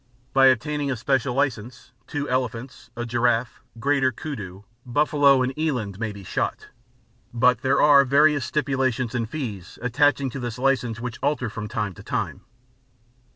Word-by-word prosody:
By 135 0 +6
obtaining 140 +3 +1
a 130 - 0
special 130 +1 0
license 125 -3 -2 0.2
two 145 0 -3
elephants, 125 -1 -3
a 120 - -3
giraffe, 120 0 0 0.2
greater 135 0 +2
kudu, 105 - -7 0.2
buffalo 140 0 +3
and 130 +1 -2
eland 125 -11 -2
may 115 -2 -2
be 100 -1 -10
shot; - - -3 0.6
but 125 0 +3
there 130 - +2
are 145 -2 +7
various 145 +1 +3
stipulations 130 -4 -1
and 115 -3 -2
fees 105 - -6
attaching 135 +2 +1
to 135 - -6
this 120 -1 -5
license 125 -3 0
which 120 -1 -6
alter 140 -6 -1
from 105 -1 -5
time 105 -3 -3
to - - -13
time. - - -3
125 Hz, 155 wpm, -24 LUFS, 115-140 Hz, 0.6 s, are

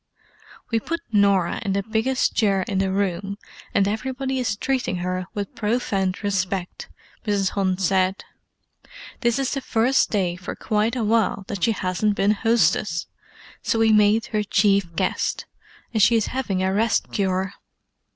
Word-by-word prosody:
"We 225 - +2
put 335 +8 -4
Norah 200 -4 +2
in 195 -3 -1
the 200 0 0
biggest 225 +5 0
chair 200 -4 +2
in 195 0 -2
the 190 0 +1
room, 195 0 -1 0.3
and 195 - +2
everybody 260 +5 -2
is 225 -5 0
treating 260 -5 -1
her 180 0 -3
with 205 -1 -4
profound 210 -4 -1
respect," 190 -2 -2 0.4
Mrs. 200 -2 +1
Hunt 190 -2 0
said. 190 +1 +1 1.0
"This 235 -3 +1
is 270 -1 -1
the 275 - -2
first 250 +2 +2
day 185 -5 0
for 180 0 -7
quite 215 +3 0
a 240 - -1
while 215 -2 +1
that 200 -3 -4
she 230 - +3
hasn't 190 +2 0
been 200 +1 +3
hostess, 205 -5 +1 0.6
so - - 0
we 225 -1 +4
made 210 +1 +4
her 215 - +2
chief 200 -4 +2
guest, - - -1 0.5
and 220 - +2
she 230 - +5
is 225 - +2
having 200 -8 -1
a 190 0 +1
rest 220 +3 +1
cure." 190 0 -1
205 Hz, 160 wpm, -23 LUFS, 190-225 Hz, 1.0 s, she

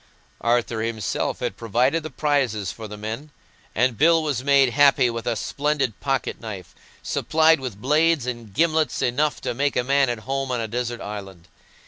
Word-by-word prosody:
Arthur 120 -1 +1
himself 110 -2 -2
had - - -2
provided 125 +8 +1
the 155 - -6
prizes 125 - 0
for 110 +2 -8
the 105 0 -9
men, 110 +8 -6 0.5
and 125 0 +1
Bill 165 +1 +5
was 140 -5 -2
made 140 -2 +4
happy 140 -2 +4
with 115 0 -5
a 120 - +1
splendid 140 -1 -1
pocket 135 -2 -2
knife, 100 -6 -8 0.3
supplied 160 0 +3
with 125 -7 -6
blades 150 +2 +2
and 120 -4 -5
gimlets 160 +4 +1
enough 145 +5 +1
to - - -2
make 140 +3 0
a 125 - +1
man 135 0 +2
at 120 -2 -3
home 135 +2 -3
on 125 - -1
a 115 - -2
desert 120 +1 -3
island. 95 -4 -8
125 Hz, 175 wpm, -23 LUFS, 115-145 Hz, 0.5 s, Bill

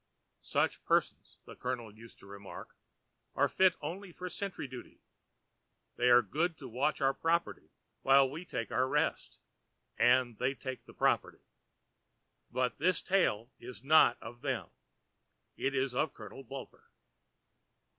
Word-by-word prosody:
Such - - 0
persons, - - 0
the - - -11
Colonel 120 -4 -4
used 115 +2 -15
to - - -17
remark, 100 0 -10 0.6
are - - +3
fit 185 -2 +4
only 180 +6 -6
for 180 +1 -7
sentry 195 -5 -4
duty; 130 -1 -11 0.9
they 125 - +2
are 120 0 +7
good 165 +2 -1
to 135 - -9
watch 130 +6 -1
our 135 0 +3
property 170 +3 -1 0.3
while 135 0 +6
we 150 +6 -7
take 120 -10 -4
our 130 +1 +2
rest—and 125 -2 -1
they 130 +2 0
take 130 -1 -7
the - - -15
property. - - 0 1.1
But 125 +1 -1
this 180 +5 +2
tale 130 - +1
is 125 0 -10
not 140 -4 +6
of 120 +1 -10
them; 135 -4 -3 0.8
it 140 - -1
is 130 -1 0
of 145 +3 0
Colonel 105 +5 -10
Bulper. 135 +1 -10
130 Hz, 135 wpm, -32 LUFS, 120-155 Hz, 1.1 s, are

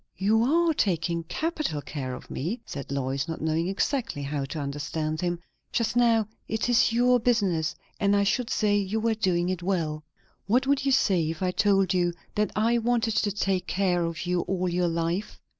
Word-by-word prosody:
"You 215 +4 +3
are 325 +7 +3
taking 170 - 0
capital 305 - -2
care 135 -3 -5
of - - -12
me," 180 - -3
said 140 -1 -7
Lois, 135 +1 -1
not 165 - -4
knowing 160 +2 0
exactly 200 - -1
how 140 0 -2
to 145 - -6
understand 155 +2 -3
him. 175 -1 -1 0.3
"Just 230 -1 0
now 230 -3 +4 0.2
it 220 +1 -1
is 235 -1 +4
your 245 +1 +4
business; 195 -10 +1 0.2
and 200 0 +3
I 200 - +3
should 225 +4 0
say 210 -1 +2
you 205 +2 -1
were 225 0 +1
doing 185 -5 +1
it 185 -1 -2
well." 165 -5 -1 0.4
"What 250 +6 +3
would 275 0 +1
you - - +3
say 180 -10 +3
if 165 +3 -4
I 180 - +1
told 195 -1 +2
you 175 -1 +1 0.2
that 210 0 +1
I 230 +3 +2
wanted 230 -1 +1
to 205 - +2
take 190 -2 -1
care 180 -2 +1
of 165 +1 -3
you 180 0 +1
all 185 0 -1
your 175 0 +1
life?" 170 +4 -2
190 Hz, 190 wpm, -27 LUFS, 165-225 Hz, 0.4 s, now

